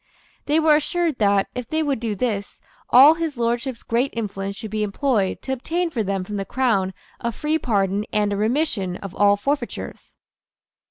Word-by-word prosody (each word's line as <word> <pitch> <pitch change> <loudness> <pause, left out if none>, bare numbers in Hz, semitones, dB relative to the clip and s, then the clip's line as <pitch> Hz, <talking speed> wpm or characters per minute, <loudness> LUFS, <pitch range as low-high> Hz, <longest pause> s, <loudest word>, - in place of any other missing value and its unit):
They 300 +2 +3
were 310 -1 +5
assured 325 -1 -1
that, 200 -2 +3
if 250 -2 -6
they 315 0 0
would 280 -5 -1
do 220 -2 -2
this, 205 -2 -3 0.3
all 275 +5 +9
His 325 -4 -3
Lordship's 235 +1 -1
great 245 +4 0
influence 200 -3 -4
should 220 -1 -8
be 215 0 -1
employed 210 -1 0
to 265 - -2
obtain 335 +7 -2
for 235 - -1
them 195 -2 -1
from 205 +2 -5
the 195 - -2
Crown 195 -5 0 0.2
a 235 - -2
free 305 +6 -1
pardon 200 -3 0
and 210 -1 +1
a - - 0
remission 215 - 0
of 195 -2 -8
all 205 0 +4
forfeitures. 280 +7 -4
230 Hz, 180 wpm, -22 LUFS, 200-280 Hz, 0.3 s, all